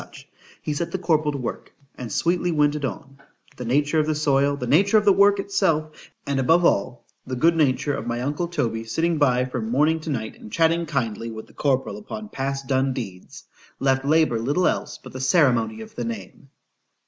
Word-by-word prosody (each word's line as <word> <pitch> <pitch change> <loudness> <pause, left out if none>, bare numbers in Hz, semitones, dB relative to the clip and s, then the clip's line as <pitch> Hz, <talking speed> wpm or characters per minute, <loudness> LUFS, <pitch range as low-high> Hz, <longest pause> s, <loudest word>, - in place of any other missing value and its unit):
—he 150 - -2
set 165 +3 -2
the - - -3
corporal 155 -4 +1
to 145 - -4
work——and 125 -1 -8
sweetly 175 - +1
went 150 -2 +2
it 150 - -5
on:——The 135 -2 -8
nature 145 +6 +2
of 155 - +1
the 155 - 0
soil,—the 140 -2 +1
nature 195 - +4
of 210 - +2
the 200 - +6
work 200 +1 +5
itself,—and 155 -7 -2
above 165 +7 +3
all, 120 +1 0 0.2
the 130 - -3
good 165 +6 +3
nature 145 -2 +1
of 120 - -4
my 120 0 -2
uncle 145 +6 -2
Toby 115 -9 -2
sitting 160 +8 -1
by 125 -3 +3
from 125 -3 -4
morning 150 +6 +2
to 155 - -7
night, 110 -6 -4
and 105 - -12
chatting 165 +3 +2
kindly 115 -6 -2
with 110 -1 -8
the - - -21
corporal 135 +4 0
upon 215 0 -8
past 135 -2 -3
done 130 +1 +1
deeds,—left 130 +4 -4
LABOUR 155 -5 +2
little 145 +10 +1
else - - -2
but - - -13
the 130 - -6
ceremony 120 -6 +2
of 110 - -11
the 120 - -4
name. 115 +4 -7
140 Hz, 185 wpm, -23 LUFS, 125-160 Hz, 0.2 s, the